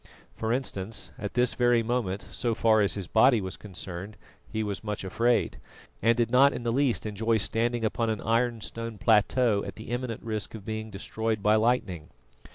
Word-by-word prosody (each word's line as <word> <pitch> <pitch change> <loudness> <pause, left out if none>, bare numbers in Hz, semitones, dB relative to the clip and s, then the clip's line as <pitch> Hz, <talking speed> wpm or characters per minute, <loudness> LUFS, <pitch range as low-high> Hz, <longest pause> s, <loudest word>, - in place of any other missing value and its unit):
For 110 0 -2
instance, 110 -5 -2
at 105 -3 -5
this 125 -2 +3
very 120 -1 +3
moment, 110 -5 -2
so 115 -2 -1
far 110 -1 +4
as 100 - +2
his 100 -4 -4
body 120 +4 +5
was 95 -1 -4
concerned, 95 +1 -8 0.3
he 110 - -1
was 105 0 -4
much 105 -2 -4
afraid, 115 +6 +1 0.4
and 115 +2 +3
did 115 -1 +1
not 135 +3 +6
in - - -5
the 115 -1 0
least 135 -3 +1
enjoy 110 +2 0
standing 115 +3 0
upon 115 +1 0
an 110 -2 -1
ironstone 115 -1 -1
plateau 110 0 +3
at - - -7
the 110 +2 -9
imminent 120 -2 -3
risk 110 -1 -4
of 105 -3 -10
being 110 0 -4
destroyed 110 +1 -3
by 105 - +4
lightning. 110 -8 0
110 Hz, 180 wpm, -28 LUFS, 105-120 Hz, 0.4 s, not